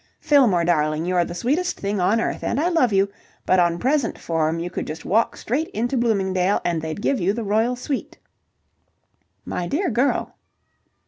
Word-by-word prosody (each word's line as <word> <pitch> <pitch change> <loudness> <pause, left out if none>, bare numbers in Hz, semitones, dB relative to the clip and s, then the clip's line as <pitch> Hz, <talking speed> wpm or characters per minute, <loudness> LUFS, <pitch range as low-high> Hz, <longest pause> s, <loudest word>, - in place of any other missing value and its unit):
"Fillmore, 235 - +3
darling, 155 -1 +1
you're 180 -1 +2
the 175 - -7
sweetest 290 - -1
thing 200 0 -2
on 200 +5 +2
earth, - - -2
and 250 - -1
I 335 +4 +2
love 325 -10 +2
you, 195 0 +2 0.4
but 185 - +3
on 170 -1 +2
present 265 +2 0
form 160 -1 -1
you 175 +1 -4
could - - -4
just 155 +2 -7
walk 225 +5 +1
straight 290 +8 -2
into 240 +5 -1
Bloomingdale 195 -5 +1
and 170 -2 0
they'd 160 +5 -5
give 275 - +1
you 190 +2 +1
the 230 +1 -3
royal 220 +4 +1
suite." 260 +2 -4 1.3
"My 175 - -3
dear 345 - 0
girl..." 250 +5 0
205 Hz, 180 wpm, -22 LUFS, 175-250 Hz, 1.3 s, Fillmore